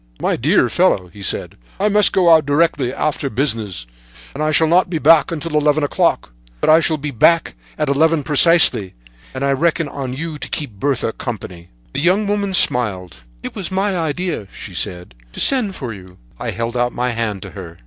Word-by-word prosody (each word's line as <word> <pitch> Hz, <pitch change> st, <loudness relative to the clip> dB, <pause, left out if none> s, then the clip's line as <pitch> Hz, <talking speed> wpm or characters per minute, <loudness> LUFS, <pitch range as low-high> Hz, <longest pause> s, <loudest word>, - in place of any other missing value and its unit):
"'My -, -, 0 dB
dear -, -, +2 dB
fellow,' 90 Hz, -2 st, +1 dB
he 100 Hz, +3 st, -14 dB
said, 100 Hz, -, -2 dB, 0.2 s
'I 210 Hz, +2 st, +2 dB
must 210 Hz, -1 st, +4 dB
go 185 Hz, -2 st, +2 dB
out 160 Hz, -2 st, +6 dB
directly 145 Hz, -3 st, +1 dB
afterward 140 Hz, -2 st, -3 dB
on -, -, -15 dB
business, 110 Hz, -, -2 dB, 0.5 s
and 145 Hz, -, -6 dB
I 155 Hz, -, +1 dB
shall 160 Hz, +1 st, +4 dB
not 175 Hz, +3 st, +3 dB
be 170 Hz, -, -2 dB
back 155 Hz, 0 st, +4 dB
until 165 Hz, -1 st, -4 dB
eleven 150 Hz, 0 st, +2 dB
o'clock; 145 Hz, -, 0 dB, 0.3 s
but -, -, +3 dB
I 160 Hz, -, +7 dB
shall 160 Hz, -1 st, 0 dB
be 150 Hz, 0 st, -5 dB
back 165 Hz, +7 st, +2 dB, 0.2 s
at 150 Hz, -, -1 dB
eleven 155 Hz, +2 st, +2 dB
precisely, 150 Hz, -, +4 dB, 0.4 s
and 135 Hz, +1 st, -3 dB
I 140 Hz, -, +1 dB
reckon 165 Hz, +3 st, 0 dB
on 135 Hz, -3 st, -5 dB
you 155 Hz, +2 st, -5 dB
to -, -, -5 dB
keep 120 Hz, -10 st, -5 dB
Bertha 135 Hz, -4 st, -1 dB
company.' 90 Hz, -8 st, -7 dB, 0.2 s
"The -, -, -2 dB
young 185 Hz, +6 st, +2 dB
woman 200 Hz, -1 st, -1 dB
smiled. 95 Hz, -, +1 dB, 0.3 s
"'It -, -, -6 dB
was 195 Hz, -2 st, -5 dB
my 195 Hz, +1 st, 0 dB
idea,' 165 Hz, -, -3 dB
she 95 Hz, -, -9 dB
said, 90 Hz, -, -4 dB, 0.2 s
'to -, -, -7 dB
send 240 Hz, -8 st, +2 dB
for 125 Hz, -5 st, -6 dB
you.' 95 Hz, -2 st, -14 dB, 0.2 s
"I -, -, -4 dB
held 115 Hz, +1 st, -4 dB
out 120 Hz, 0 st, 0 dB
my 125 Hz, +1 st, -1 dB
hand 115 Hz, -4 st, -3 dB
to -, -, -9 dB
her. 85 Hz, -4 st, -10 dB
145 Hz, 200 wpm, -18 LUFS, 115-165 Hz, 0.5 s, I